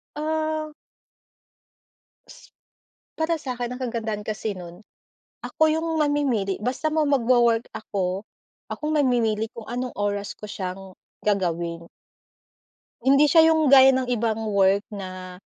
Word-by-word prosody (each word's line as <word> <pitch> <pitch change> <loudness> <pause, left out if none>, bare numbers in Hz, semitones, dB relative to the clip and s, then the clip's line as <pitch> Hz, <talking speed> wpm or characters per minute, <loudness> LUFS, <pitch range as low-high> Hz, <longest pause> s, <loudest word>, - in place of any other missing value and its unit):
Ah. 310 0 -2 2.5
Para 320 0 0
sa 255 -3 -5
'kin 245 0 -4
ang 250 - -6
kagandahan 225 -4 -4
kasi 215 0 -3
nun, 175 +3 -11 0.6
ako 315 0 +2
yung 320 +1 -1
mamimili 275 -10 0
basta 260 +6 -1
mo 310 -1 +1
magwo-work 240 -4 +3
ako, 195 -2 -3 0.5
akong 305 0 -3
namimili 235 -6 +1
kung 230 - -9
anong 250 +1 -4
oras 205 0 -2
ko - - -28
siyang 190 0 -6 0.3
gagawin. 170 -4 -1 1.2
Hindi 275 +3 +5
siya 325 +1 +6
yung 315 -2 +2
gaya 265 0 +8
ng 260 -1 0
ibang 225 -2 -1
work 200 -1 +3
na 185 -2 -8
235 Hz, 120 wpm, -24 LUFS, 200-285 Hz, 2.5 s, gaya